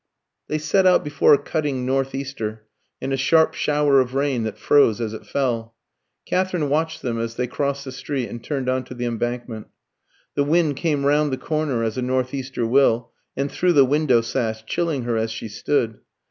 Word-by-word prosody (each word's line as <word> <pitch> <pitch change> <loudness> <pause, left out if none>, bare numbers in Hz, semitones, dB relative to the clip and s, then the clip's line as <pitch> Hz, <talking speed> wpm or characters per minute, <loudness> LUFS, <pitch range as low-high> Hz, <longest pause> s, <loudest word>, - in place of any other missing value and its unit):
They 155 - -1
set 185 +5 +2
out 180 - +5
before 145 0 +4
a - - 0
cutting 140 -5 -2
north 135 +1 0
easter 110 -6 -5 0.3
and 135 +1 -3
a - - +1
sharp 160 +4 +3
shower 145 -2 +3
of 130 0 0
rain 135 -3 +1
that 110 - -4
froze 130 -7 +4
as 110 -2 -3
it 110 - -9
fell. 115 -4 -2 0.5
Katherine 180 -5 0
watched 160 +2 -1
them 120 -3 -2
as 115 0 -3
they 125 - -1
crossed 140 +2 -2
the 130 - -6
street 130 -1 -3
and 120 0 -8
turned 135 -3 -3
on 130 0 0
to 125 - -9
the 120 0 -3
Embankment. 120 -1 -3 0.7
The 145 - +1
wind 155 0 +2
came 150 -4 0
round 145 +1 +3
the 130 - -1
corner, 150 -7 -1
as 110 +2 -2
a - - -1
north 130 +1 -1
easter 130 -3 -3
will, 120 -1 +3 0.3
and 140 +1 -1
through 180 -1 +2
the 140 -4 +6
window 135 -3 +3
sash, 115 -2 -3
chilling 160 -1 -1
her 120 -1 -1
as 110 0 -1
she 110 - -5
stood. 110 +1 -1
135 Hz, 200 wpm, -22 LUFS, 120-145 Hz, 0.7 s, the